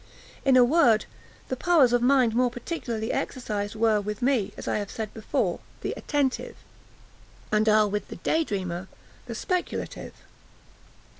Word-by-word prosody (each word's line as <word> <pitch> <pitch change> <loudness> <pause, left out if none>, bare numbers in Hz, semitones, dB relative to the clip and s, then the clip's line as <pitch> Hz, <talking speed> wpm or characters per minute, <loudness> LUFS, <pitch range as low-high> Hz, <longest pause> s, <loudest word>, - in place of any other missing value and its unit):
In 270 -2 +5
a 250 - +8
word, 245 -5 +4 0.4
the 260 - -2
powers 280 -4 +4
of 245 - +3
mind 250 -2 +4
more 250 +1 +3
particularly 235 -3 -4
exercised 210 -4 -3
were, 215 -1 +2
with 210 +2 -5
me, 250 -6 +2
as - - -8
I - - 0
have 205 -1 -5
said 220 -2 -5
before, 220 - -1 0.2
the - - -2
attentive, 280 -4 -1 1.0
and 215 +1 +3
are, 215 0 +5
with 205 0 -3
the - - -8
day 325 +1 +1
dreamer, 185 - -4 0.4
the 230 - -5
speculative. 360 - -3
230 Hz, 150 wpm, -26 LUFS, 210-260 Hz, 1.0 s, a